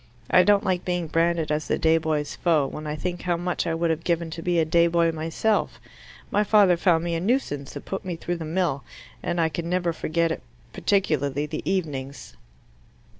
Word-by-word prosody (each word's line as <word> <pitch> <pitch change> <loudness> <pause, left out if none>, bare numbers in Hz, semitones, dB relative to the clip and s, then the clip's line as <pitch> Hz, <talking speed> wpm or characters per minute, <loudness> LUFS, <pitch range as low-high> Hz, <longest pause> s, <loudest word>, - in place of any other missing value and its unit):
I 180 - +7
don't 205 +2 +4
like 185 -3 0
being 175 -1 -1
branded 165 0 +1
as 150 0 -1
the - - +1
day 160 0 +3
boy's 155 -2 -2
foe, 160 -5 +2
when 150 +3 -6
I 150 - -2
think 175 +3 -4
how 175 -1 0
much 175 0 -2
I 165 - 0
would 165 0 +1
have 160 0 -2
given 170 -2 -1
to 165 - -6
be 175 0 0
a 165 - +3
day 170 +2 +4
boy 170 0 +2
myself. 165 +7 -1 0.5
My 210 - +3
father 205 -3 +5
found 170 -2 +2
me 170 0 -2
a 165 - 0
nuisance, 175 - -1
and - - -7
put 195 - -4
me 180 -2 -4
through 175 +1 -3
the 165 - -6
mill, 160 -4 -1 0.4
and 175 - -2
I 165 - +3
can 165 +1 -4
never 175 -1 0
forget 165 +1 0
it - - -3 0.3
particularly 150 -8 0
the 150 - -5
evenings." 140 - -4
170 Hz, 210 wpm, -25 LUFS, 155-180 Hz, 0.5 s, I